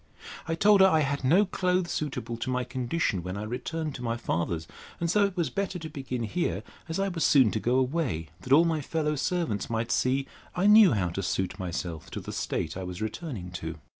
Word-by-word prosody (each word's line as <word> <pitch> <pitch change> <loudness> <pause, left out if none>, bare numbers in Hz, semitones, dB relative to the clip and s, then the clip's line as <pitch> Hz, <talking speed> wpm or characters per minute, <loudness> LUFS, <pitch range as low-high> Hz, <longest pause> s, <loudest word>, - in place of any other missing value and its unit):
I 165 - 0
told 205 +3 +5
her, 190 - +9
I 160 -4 +3
had 140 -1 -1
no 175 +11 +5
clothes 180 -2 0
suitable 130 -7 -3
to 115 - -4
my 125 0 0
condition 125 - -1
when 90 +3 -5
I 105 - -4
returned 145 +7 -3
to 130 - -8
my 115 -1 -1
father's; 85 -7 -2 0.3
and 170 -1 0
so 205 +1 +4
it 195 -2 -4
was 165 -7 0
better 195 +3 -2
to 160 -2 -7
begin 130 -5 -4
here, 170 +10 -1 0.3
as 160 - -2
I 195 - +1
was 170 -3 -2
soon 130 -7 +5
to 110 - -1
go 120 +3 +1
away, 130 - 0
that 125 - -9
all 160 +5 +7
my 160 -2 0
fellow 150 +1 -1
servants 150 - -1
might 115 0 -1
see 135 +2 +1 0.3
I 180 +2 +1
knew 210 - +8
how 95 -5 0
to 85 +3 -3
suit 95 +1 -2
myself 85 -3 -4
to - - -3
the - - -7
state 80 - -2
I 95 - -5
was 90 -1 -6
returning 110 - -5
to. 80 0 -4
130 Hz, 225 wpm, -28 LUFS, 105-170 Hz, 0.3 s, her